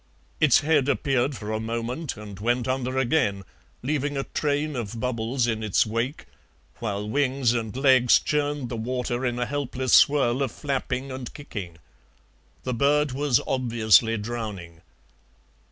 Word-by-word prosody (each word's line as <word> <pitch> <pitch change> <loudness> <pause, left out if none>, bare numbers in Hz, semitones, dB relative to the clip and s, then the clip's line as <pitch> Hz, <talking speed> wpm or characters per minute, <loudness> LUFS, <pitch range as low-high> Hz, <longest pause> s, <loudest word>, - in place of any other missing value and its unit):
Its 150 -3 +5
head 145 -3 +2
appeared 135 -1 +1
for 105 +1 -6
a 110 - -1
moment 115 +6 -4
and 105 -2 -9
went 120 +3 0
under 130 0 -1
again, 120 -7 +1 0.4
leaving 145 +1 -1
a 135 - -1
train 150 +1 -1
of 115 -2 -4
bubbles 120 +1 -1
in 110 -2 -1
its 105 -3 +2
wake, 115 +6 -3 0.5
while 105 -2 -3
wings 130 -1 +1
and 115 0 -3
legs 130 -3 +5
churned 145 -3 -1
the 120 - -4
water 125 +2 -2
in 120 -1 -1
a 125 - 0
helpless 130 -1 -2
swirl 135 -3 +5
of 135 -4 0
flapping 135 -1 -3
and 130 -2 -6
kicking. 95 - -7 0.9
The 130 - -2
bird 145 +3 +2
was 135 -1 +2
obviously 115 -3 +3
drowning. 105 -7 -6
125 Hz, 145 wpm, -25 LUFS, 115-140 Hz, 0.9 s, Its